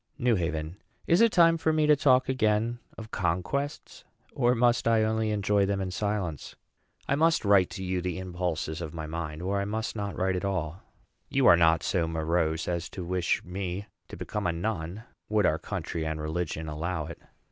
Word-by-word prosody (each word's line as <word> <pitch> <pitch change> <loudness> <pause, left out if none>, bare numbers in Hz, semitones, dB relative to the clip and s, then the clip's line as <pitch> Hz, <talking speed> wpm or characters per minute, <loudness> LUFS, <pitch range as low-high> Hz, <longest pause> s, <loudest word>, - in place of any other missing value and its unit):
NEW 120 -2 +2
HAVEN. 80 -1 -3 0.3
Is 170 +5 +4
it 230 -1 +6
time 165 -3 +5
for 160 - +2
me 155 -1 +2
to 150 0 +6
talk 130 -2 +4
again 115 -2 +1 0.2
of 110 0 -9
conquests? 95 - -2 0.3
or 125 -1 +2
must 120 0 +2
I 115 -1 +4
only 110 0 0
enjoy 100 -1 +2
them 100 0 0
in 95 -1 -3
silence? 100 -7 -3 0.5
I - - +1
must 160 -2 +2
write 100 -3 +5
to 95 - -6
you 90 -1 -1
the 90 -2 -3
impulses 90 -3 -3
of 80 -1 -6
my 80 -1 -4
mind, 80 0 -5
or 100 +2 0
I - - -2
must 110 +3 -3
not 100 -2 -4
write 95 0 +1
at 90 - -3
all. 90 -3 -2 0.5
You - - +2
are - - +9
not 80 -1 +3
so 85 -3 0
morose 80 0 0
as 85 -1 -2
to 90 - -6
wish 90 0 0
me 95 +2 -4 0.2
to - - -9
become 105 -3 -3
a - - +2
nun, 90 +2 -3 0.3
would 105 -2 +2
our - - +2
country 85 - -4
and 80 0 -3
religion 80 0 -3
allow 80 +1 -3
it. 85 - -9
95 Hz, 195 wpm, -28 LUFS, 85-110 Hz, 0.5 s, are